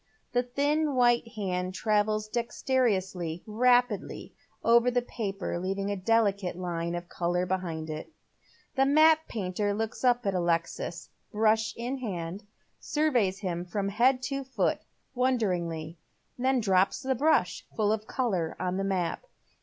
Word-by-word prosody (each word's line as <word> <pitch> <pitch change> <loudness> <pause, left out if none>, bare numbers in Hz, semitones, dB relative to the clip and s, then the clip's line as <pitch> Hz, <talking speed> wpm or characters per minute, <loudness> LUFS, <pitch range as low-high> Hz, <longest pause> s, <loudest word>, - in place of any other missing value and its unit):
The 245 - +2
thin 285 +4 0
white 240 -1 +3
hand 185 -4 -2
travels 215 0 +1
dexterously, 205 -8 -1
rapidly 245 0 +1 0.3
over 235 +1 +5
the 245 0 +1
paper, 195 -7 -4
leaving 195 +2 -2
a - - 0
dehcate 200 -2 +1
line 170 -1 -3
of 175 0 -5
colour 175 +1 -1
behind 175 -4 -3
it. 155 - -6 0.6
The 270 -1 +3
map 315 +2 +5
painter 205 -1 -2
looks 225 +3 -4
up 245 -2 +3
at 195 - +1
Alexis, 170 -1 -1 0.2
brush 220 +1 +2
in 250 +3 -3
hand, 190 -3 -5 0.3
sui 310 +1 0
veys 200 -6 +1
him 175 -3 -2
from 200 +2 -2
head 250 +5 +3
to 275 0 -2
foot, 265 0 0 0.3
wonderingly, 180 -11 -1 0.4
and 260 -2 +2
drops 190 +5 +2
the 265 0 +1
brush, 300 +6 +1
full 210 -2 +2
of 215 0 -4
colour, 190 -11 -1
on 185 0 -1
the 195 - -1
map. 190 - -1
210 Hz, 140 wpm, -28 LUFS, 180-245 Hz, 0.6 s, over